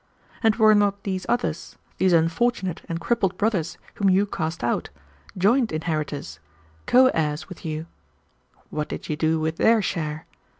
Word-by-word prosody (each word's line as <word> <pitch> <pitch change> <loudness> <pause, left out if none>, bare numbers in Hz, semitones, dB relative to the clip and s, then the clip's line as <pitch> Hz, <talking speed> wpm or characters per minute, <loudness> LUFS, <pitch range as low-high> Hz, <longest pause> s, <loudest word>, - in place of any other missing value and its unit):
And 220 -2 +3
were 215 -1 +6
not 200 -1 +2
these 190 -2 -3
others, 240 0 -2 0.2
these 190 - +3
unfortunate 175 +3 +1
and 165 0 -2
crippled 195 -1 0
brothers 190 -6 0 0.2
whom 200 -2 +1
you 190 +2 +4
cast 160 -7 -4
out, 120 - -1 0.5
joint 225 +6 +3
inheritors, 155 - -3 0.5
co 255 +1 +6
heirs 150 -1 -1
with 185 - -11
you? 155 0 -4 0.9
What 150 0 -3
did - - -6
you 155 - 0
do 160 +1 +1
with 160 +1 -2
their 225 0 +4
share? 155 -4 -3
175 Hz, 155 wpm, -24 LUFS, 155-205 Hz, 0.9 s, were